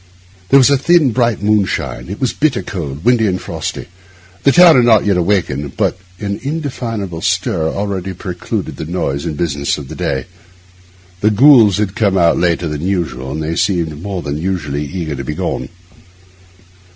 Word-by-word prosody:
There 135 - +7
was 135 +1 +5
a 140 - +3
thin, 160 -2 +4
bright 120 -3 0
moonshine; 95 - 0
it 100 - -6
was 130 -3 0
bitter 150 -2 0
cold, 75 -3 -6
windy, 120 -3 +3
and 90 -1 -1
frosty; - - -5 0.6
the 140 - +4
town 175 +1 +7
had 125 - +5
not 110 -3 +4
yet 100 -2 +2
awakened, 85 -7 -1
but - - 0 0.2
an 100 -1 -3
indefinable 120 - -4
stir 80 -1 0
already 95 -1 -3
preluded 90 -1 -5
the - - -5
noise 75 -4 -2
and 75 - -4
business 70 -4 -1
of 70 -3 -9
the - - -7
day. 65 -1 -2 0.9
The 105 - +3
ghouls 110 -3 +6
had 105 -2 -1
come 105 -4 +1
later 85 -1 +2
than 75 -1 -4
usual, 80 -9 -2
and 80 +2 -3
they 80 +2 -2
seemed 85 -5 -1
more 95 -2 -4
than 70 +1 -3
usually 75 -5 -2
eager 80 -1 -4
to 70 - -5
be 75 +4 -4
gone. - - -3
95 Hz, 175 wpm, -16 LUFS, 80-110 Hz, 0.9 s, There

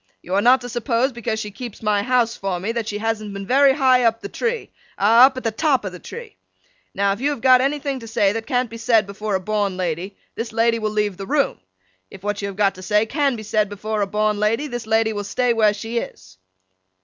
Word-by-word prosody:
You 180 - -6
are 200 - +3
not 250 +3 +5
to 245 - -6
suppose 240 +2 0
because 235 -2 -3
she 210 -1 -5
keeps 230 +1 -9
my 210 -1 +2
house 240 0 +1
for 190 -2 -3
me, 200 +5 -2
that 230 -2 -3
she 205 - -3
hasn't 215 -1 -3
been 195 0 -6
very 270 +4 +5
high 260 -3 +4
up 225 -1 +2
the - - -7
tree—ah, 250 - +2
up 265 -1 -6
at 255 - -5
the 225 - 0
top 265 0 +1
of 190 - -3
the 180 - -10
tree! 465 - -10 0.6
Now, 200 0 +2
if 200 - -8
you 285 - +2
have 285 -5 -4
got 255 -1 +6
anything 280 0 -1
to 230 - -10
say 215 -3 +2
that 225 +1 -5
can't 250 -2 0
be 230 - -7
said 225 -2 +3
before 205 +1 -3
a - - +1
born 200 -1 -1
lady, 180 +2 -3 0.2
this 230 0 -5
lady 230 +1 +2
will 215 -1 -1
leave 210 -3 -1
the 195 - -7
room. 285 -1 0 0.5
If 190 - -13
what 205 0 -2
you 200 - -2
have 195 -1 -7
got 200 -2 +3
to 185 - -12
say 210 +3 +2
can 280 +2 0
be 220 - -7
said 215 -1 0
before 210 +1 -3
a 200 - 0
born 210 +1 0
lady, 225 +7 +1
this 240 -5 -6
lady 220 0 +2
will 205 -1 -3
stay 245 +4 0
where 215 -2 +4
she 225 +3 -3
is. 95 - -10
220 Hz, 250 wpm, -21 LUFS, 205-245 Hz, 0.6 s, got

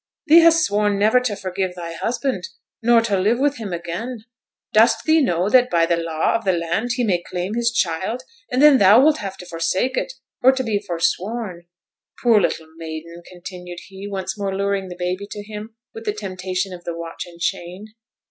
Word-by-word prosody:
'Thee 325 +1 +8
hast 330 -1 +5
sworn 205 0 +1
never 215 +5 +4
to 250 -5 -2
forgive 185 -1 -3
thy 170 -2 -6
husband, 240 - -2 0.3
nor 235 0 +5
to 205 -4 0
live 215 +6 +2
with 285 +2 +1
him 215 -4 -6
again. 175 +8 -5 0.5
Dost 225 +2 +4
thee 315 0 +4
know 180 - +1
that 250 +3 +4
by 170 -6 +3
the 170 - +2
law 165 -1 0
of 230 - -1
the 190 -3 +2
land, 175 +8 -1
he 250 - 0
may 185 -6 +1
claim 180 +3 -4
his 235 0 +1
child; 200 +4 -1 0.3
and 255 +3 +2
then 295 -3 +8
thou 200 +4 +7
wilt 300 +3 +4
have 195 -1 -6
to 180 - -10
forsake 175 +9 -1
it, - - -2 0.3
or 260 - +7
to 260 0 -2
be 215 -4 0
forsworn? 185 0 -2 0.6
Poor 230 -4 +5
little 165 -2 -1
maiden!' 165 +1 -8
continued 180 0 -9
he, 195 +1 -8
once 190 -1 -4
more 195 -1 -2
luring 200 -1 -1
the 180 - -7
baby 180 +3 -3
to 205 - -7
him 215 +1 -9 0.2
with 225 0 -9
the 210 - 0
temptation 185 -2 -4
of 175 -1 -10
the 170 -1 -5
watch 165 +1 -6
and 170 -1 -14
chain. 190 +4 -4
200 Hz, 200 wpm, -21 LUFS, 175-230 Hz, 0.6 s, Thee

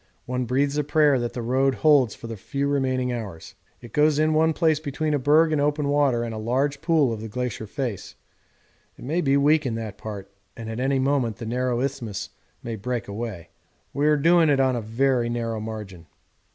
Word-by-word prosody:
One 125 0 -2
breathes 140 +4 0
a - - +1
prayer 145 -2 +3
that 120 -1 -3
the 120 - -4
Road 130 +3 +1
holds 145 -8 +4
for - - -11
the 115 0 -5
few 140 +8 -3
remaining 130 -3 0
hours. 100 -9 -7 0.3
It 120 - -12
goes 150 0 +3
in 155 +1 +2
one 160 +1 +3
place 160 -2 +2
between 155 +1 -2
a 145 - +1
berg 155 +4 +4
in 150 - +1
open 145 0 0
water 140 -5 +2
and 115 -1 -4
a 110 - -5
large 135 +6 -1
pool 155 -8 +2
of 110 - -6
the 110 - -5
glacier 120 -1 -4
face 120 -4 -5 0.8
it - - -11
may 160 +6 0
be 140 -3 +3
weak 150 +2 +3
in 120 -4 -2
that 110 -3 -6
part, 100 -2 -7 0.3
and 115 -1 -6
at 110 - -5
any 135 +1 +1
moment 130 -4 +1
the 115 - -8
narrow 125 +1 -1
isthmus 120 -7 -4 0.3
may 115 -1 -4
break 120 +2 -4
away. 100 -5 -6 0.4
We 145 +2 +1
are 150 0 +4
doing 165 +2 +4
it 140 -2 +3
on 130 -1 +2
a 120 - -2
very 120 +2 +1
narrow 115 -2 -2
margin. 105 -6 -7
130 Hz, 210 wpm, -24 LUFS, 115-145 Hz, 0.8 s, holds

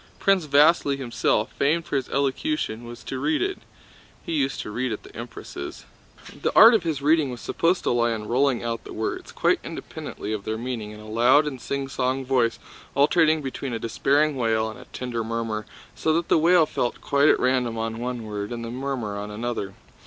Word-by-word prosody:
Prince 195 -5 +2
Vasíli 145 0 +4
himself, 120 -3 0
famed 160 +4 +2
for - - -3
his 135 -2 -1
elocution, 140 - -1
was 120 0 -10
to 130 - -5
read 305 - +1
it. 390 +1 -1 0.7
(He - - -4
used 135 -3 0
to - - -7
read 125 +3 -2
at 110 - -5
the - - -15
Empress'.) 70 - -8 0.6
The - - +1
art 225 +2 +10
of 225 - +4
his 160 -4 -3
reading 155 -1 +3
was 125 -1 -6
supposed 175 +8 0
to - - +1
lie 120 -1 +2
in 110 -2 -3
rolling 130 +1 +2
out 115 -1 -3
the - - -9
words, 110 - -4
quite - - +2
independently 105 - -6
of 105 -2 -4
their 110 +1 -3
meaning, 115 -3 -4
in 105 0 -10
a 105 - -11
loud 120 +7 +4
and 135 -5 -5
singsong 135 -1 -2
voice 125 -3 +2 0.4
alternating 155 +2 +4
between 135 -1 -4
a - - -1
despairing 145 +6 +1
wail 110 -3 +1
and 110 - -12
a 125 - -12
tender 120 -2 -4
murmur, 110 -2 -3 0.3
so 160 - 0
that 170 +1 0
the - - +5
wail 170 0 +5
fell 120 -5 -1
quite 140 +1 +3
at - - +4
random 125 -3 +1
on 115 0 -3
one 120 -1 -3
word 105 -1 -5
and 115 -1 -4
the 115 - -5
murmur 125 -5 -3
on 105 +1 -5
another. 105 -2 -4
125 Hz, 205 wpm, -24 LUFS, 115-145 Hz, 0.7 s, art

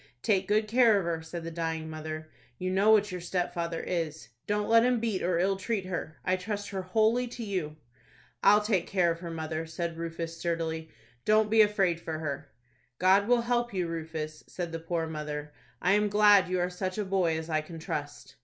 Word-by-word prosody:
"Take 195 -3 +2
good 215 +1 +2
care 230 -1 +5
of 195 - -1
her," 165 -1 -1
said 165 +1 -7
the 165 - -5
dying 160 -1 -3
mother. 155 0 -6 0.3
"You 185 0 -2
know 195 +3 +3
what 210 -2 +5
your 180 -1 -5
stepfather 175 -2 -2
is. 160 -5 -3 0.2
Don't 210 0 0
let 230 0 +6
him 250 -1 +3
beat 220 -4 -1
or 175 0 +1
ill 190 +3 +2
treat 200 0 -2
her. 175 -3 -5
I 185 0 +2
trust 205 +2 -4
her 190 -1 -3
wholly 220 +6 +2
to 240 0 -7
you." 180 -8 -3 0.7
"I'll 210 +1 +7
take 210 -5 0
care 180 -3 +2
of 165 - -4
her, 170 -1 -6
mother," 160 0 -4
said 165 0 -4
Rufus, 165 0 -4
sturdily. 165 -1 -2 0.3
"Don't 215 0 +3
be 220 0 +7
afraid 195 -5 +2
for 160 -1 -4
her." 145 -2 -5 0.5
"God 195 +3 +4
will 245 0 +4
help 240 -2 0
you, 180 -2 0
Rufus," 160 -2 -5
said 175 -2 -5
the 165 - -4
poor 165 0 -2
mother 150 -2 -5 0.3
"I 180 - +4
am 210 +1 +3
glad 205 -2 +6
you 185 0 0
are 175 0 +1
such 185 +1 -3
a 210 - -1
boy 185 -4 +1
as 160 0 -5
I 155 -2 +1
can 165 +2 -10
trust." 145 -5 -6
180 Hz, 210 wpm, -29 LUFS, 160-205 Hz, 0.7 s, I'll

